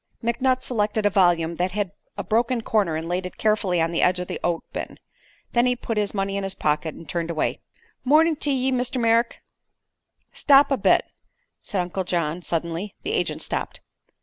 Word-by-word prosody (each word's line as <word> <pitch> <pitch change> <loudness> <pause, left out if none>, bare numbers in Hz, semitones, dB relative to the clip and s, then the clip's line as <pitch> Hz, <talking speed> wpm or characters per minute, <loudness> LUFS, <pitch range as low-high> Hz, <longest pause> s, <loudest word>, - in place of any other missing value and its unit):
McNutt 255 +2 +1
selected 215 -3 -1
a 205 - +4
volume 170 -4 +2
that 180 +1 -1
had 205 -3 -1 0.3
a - - -3
broken 235 +2 +1
corner 200 -9 +1
and 160 +1 -4
laid 180 +1 -2
it - - -14
carefully 210 -5 +1
on 165 0 +1
the 170 - 0
edge 180 0 +3
of 180 - -4
the - - -4
oat 170 -1 0
bin. - - -5 0.5
Then 240 +1 +3
he 250 - +2
put 230 -2 -4
his 205 -1 +1
money 195 0 -1
in 200 - -2
his 195 0 -3
pocket 155 +1 -1
and 165 - -12
turned 170 +2 -3
away. 160 -2 -1 0.4
"Morn'n' 310 +4 +4
to 295 - -2
ye, 265 -1 +1
Mr. 255 0 -1
Merrick." 230 0 +2 0.9
"Stop 285 0 +5
a - - +4
bit," - - +3 0.6
said 200 -5 -2
Uncle 180 +2 -3
John, 170 -2 -1
suddenly. 170 +4 -3
The 415 - -2
agent - - -1
stopped. - - -4
200 Hz, 195 wpm, -24 LUFS, 175-240 Hz, 0.9 s, Stop